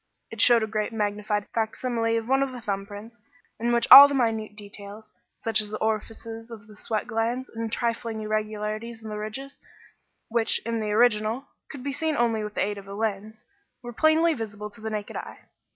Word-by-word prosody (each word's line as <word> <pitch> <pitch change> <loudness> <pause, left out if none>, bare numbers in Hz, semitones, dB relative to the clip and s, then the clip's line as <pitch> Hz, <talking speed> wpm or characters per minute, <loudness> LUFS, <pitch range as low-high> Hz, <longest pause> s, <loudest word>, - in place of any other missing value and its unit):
It 225 -2 -2
showed 235 -2 +6
a - - +1
greatly 215 +1 -3
magnified 210 0 -1
facsimile 230 0 -1
of 225 0 -4
one 270 +1 +3
of 275 -1 0
the 250 - -7
thumb 200 -3 -3
prints, 220 +3 -11 0.4
in 235 +1 0
which 235 0 +2
all 280 +1 +14
the 285 - -2
minute 220 -4 0
details, 205 +1 -9 0.3
such 220 -1 +2
as 210 - -4
the 215 - -4
orifices 225 +1 -4
of 220 -3 -10
the 210 0 -15
sweat 215 0 -3
glands 230 +4 -2
and 225 -1 -5
trifling 230 -1 -2
irregularities 215 +1 -3
in 220 - -7
the 210 0 -5
ridges, 265 +6 -6 0.7
which, 230 -1 +1
in 230 0 -1
the 215 -1 -2
original, 220 +3 +2 0.2
could 275 -4 -8
be 280 - -2
seen 315 +1 -1
only 230 -2 +1
with 210 0 -6
the - - +1
aid 205 0 -4
of 195 - -14
a 200 - -7
lens, 215 0 -4 0.4
were 240 0 -7
plainly 315 +5 +3
visible 210 -4 -6
to 210 - -15
the 220 - -4
naked 210 -1 -5
eye. - - -8
220 Hz, 200 wpm, -26 LUFS, 210-235 Hz, 0.7 s, all